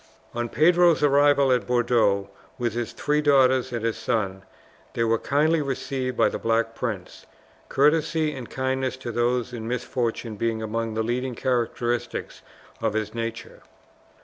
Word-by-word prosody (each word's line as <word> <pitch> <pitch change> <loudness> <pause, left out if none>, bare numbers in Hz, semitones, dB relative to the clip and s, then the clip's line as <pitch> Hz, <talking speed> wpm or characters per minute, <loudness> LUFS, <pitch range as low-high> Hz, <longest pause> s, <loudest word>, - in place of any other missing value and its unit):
On 120 0 -2
Pedro's 170 +2 +4
arrival 145 -1 +4
at 125 -1 +1
Bordeaux 115 -5 +2 0.3
with 120 -4 -1
his 120 0 -3
three 150 +5 0
daughters 130 -3 +3
and 115 -2 -3
his 115 - -1
son, 100 -5 -1 0.5
they 115 - +1
were 115 0 +2
kindly 155 +3 +2
received 130 -2 -3
by - - +4
the - - -3
Black 115 0 0
Prince, 110 -7 -5 0.4
courtesy 155 +2 +2
and 130 -4 -8
kindness 130 0 -2
to 125 -2 -6
those 120 +1 0
in 115 -2 -5
misfortune 120 -2 -3
being 115 +1 -1
among 115 0 -3
the 110 - 0
leading 125 +2 -2
characteristics 120 -1 -2 0.4
of 110 -2 0
his 110 -1 -2
nature. 115 0 -5
120 Hz, 150 wpm, -25 LUFS, 115-135 Hz, 0.5 s, Pedro's